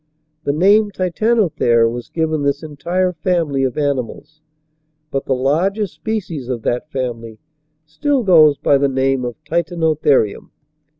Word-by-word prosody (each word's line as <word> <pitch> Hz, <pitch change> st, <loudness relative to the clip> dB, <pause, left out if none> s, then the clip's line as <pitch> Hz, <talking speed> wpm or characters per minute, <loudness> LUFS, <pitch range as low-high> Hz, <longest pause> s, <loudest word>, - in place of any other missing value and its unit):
The -, -, +1 dB
name 200 Hz, +7 st, +4 dB
Titanothere 185 Hz, -, +1 dB
was 120 Hz, +1 st, -5 dB
given 160 Hz, -2 st, -1 dB
this 140 Hz, +2 st, -1 dB
entire 175 Hz, +5 st, -2 dB
family 160 Hz, -4 st, -1 dB
of 130 Hz, +1 st, -2 dB
animals, 145 Hz, +2 st, -3 dB, 0.7 s
but 135 Hz, -, -2 dB
the 135 Hz, -, 0 dB
largest 180 Hz, +10 st, 0 dB
species 175 Hz, -, -4 dB
of 120 Hz, -3 st, -3 dB
that 125 Hz, +6 st, -2 dB
family 115 Hz, -5 st, -5 dB, 0.5 s
still 275 Hz, -, -1 dB
goes 155 Hz, -7 st, +5 dB
by 140 Hz, -, +2 dB
the 140 Hz, -, +2 dB
name 135 Hz, 0 st, 0 dB
of 120 Hz, -1 st, -4 dB
Titanotherium. 160 Hz, -, 0 dB
150 Hz, 130 wpm, -18 LUFS, 130-180 Hz, 0.7 s, goes